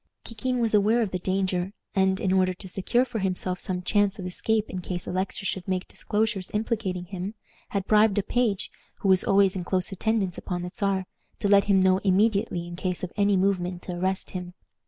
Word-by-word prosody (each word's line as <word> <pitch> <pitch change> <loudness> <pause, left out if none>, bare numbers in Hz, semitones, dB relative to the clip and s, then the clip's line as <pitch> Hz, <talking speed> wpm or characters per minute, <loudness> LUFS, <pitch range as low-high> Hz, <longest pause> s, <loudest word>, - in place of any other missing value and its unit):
Kikin 250 +3 -2
was 230 -2 +1
aware 215 +3 +4
of 200 - -3
the 185 - -2
danger, 185 0 -1 0.2
and, 190 0 +2
in 190 -2 +1
order 185 -1 +2
to 190 - -10
secure 195 +7 +1
for 230 - -4
himself 185 -1 -2
some 180 -1 -3
chance 205 +1 +2
of 185 - -6
escape 215 +4 0
in 185 - -5
case 175 -1 -3
Alexis 190 +2 -2
should 185 +1 -3
make 185 -1 -1
disclosures 210 -3 -1
implicating 210 -5 -1
him, 190 +3 -5 0.3
had 200 -2 -2
bribed 215 -1 +4
a 205 - +2
page, 220 -3 0 0.3
who 195 - +1
was 185 -1 +5
always 195 -1 +4
in 185 - -3
close 185 +1 -1
attendance 195 -2 -1
upon 175 -1 -4
the 180 - -5
Czar, 195 -2 0 0.3
to - - -1
let 200 -1 +5
him 200 -2 +4
know 185 0 +4
immediately 200 -2 +2
in 175 0 -7
case 180 0 -2
of 180 - -4
any 200 -1 +3
movement 185 -2 0
to - - -5
arrest 185 +2 -2
him. 180 -1 -6
190 Hz, 205 wpm, -26 LUFS, 185-205 Hz, 0.3 s, was